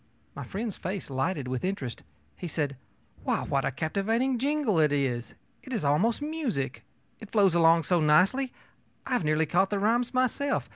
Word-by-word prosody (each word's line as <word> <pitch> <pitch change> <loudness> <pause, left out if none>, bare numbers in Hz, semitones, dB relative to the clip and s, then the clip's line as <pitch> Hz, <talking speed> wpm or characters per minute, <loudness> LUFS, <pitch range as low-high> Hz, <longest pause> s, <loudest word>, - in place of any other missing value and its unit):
My - - -5
friend's 215 +1 -4
face 185 -4 -5
lighted 135 +1 -1
with 130 -1 -3
interest. 165 -11 -3 0.3
He 180 - -6
said: 145 -4 -2 0.5
ōWhy, - - -1
what 135 -1 +1
a - - +2
captivating 220 - 0
jingle 275 - +1
it 150 -2 +4
is! 130 -4 -1 0.3
It 260 - -11
is 225 - -2
almost 215 - +2
music. 225 - -3 0.4
It 220 - -10
flows 200 -5 +4
along 165 -1 +5
so 175 +3 +2
nicely. 190 - +3 0.5
I - - -7
have 245 - +1
nearly 155 +1 +2
caught 180 +5 +2
the 205 - -1
rhymes 230 +4 +1
myself. 255 +2 0
185 Hz, 175 wpm, -28 LUFS, 150-235 Hz, 0.5 s, along